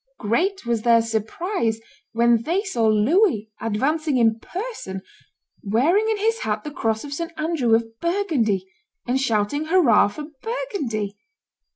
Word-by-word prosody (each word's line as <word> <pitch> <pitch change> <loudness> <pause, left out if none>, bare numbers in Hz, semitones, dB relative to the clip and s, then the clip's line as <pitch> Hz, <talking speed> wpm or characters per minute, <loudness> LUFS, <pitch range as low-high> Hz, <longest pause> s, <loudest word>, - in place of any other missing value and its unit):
Great 340 - 0
was 235 -2 0
their 230 0 +5
surprise 225 - -1 0.3
when 235 0 +3
they 350 - 0
saw 240 - 0
Louis 220 - +3
advancing 275 +7 0
in 225 -2 +3
person, 355 - -6 0.6
wearing 315 - +2
in 440 - +1
his 450 +2 0
hat 210 0 -2
the 300 - -6
cross 220 -5 -1
of 285 -1 -6
St. 335 +4 -4
Andrew 310 -8 +2
of 225 0 -3
Burgundy, 305 - 0 0.4
and 255 +2 0
shouting, 230 +4 0
"Hurrah 315 - +5
for 250 +9 -7 0.2
Burgundy!" 265 - -3
240 Hz, 140 wpm, -23 LUFS, 220-345 Hz, 0.6 s, their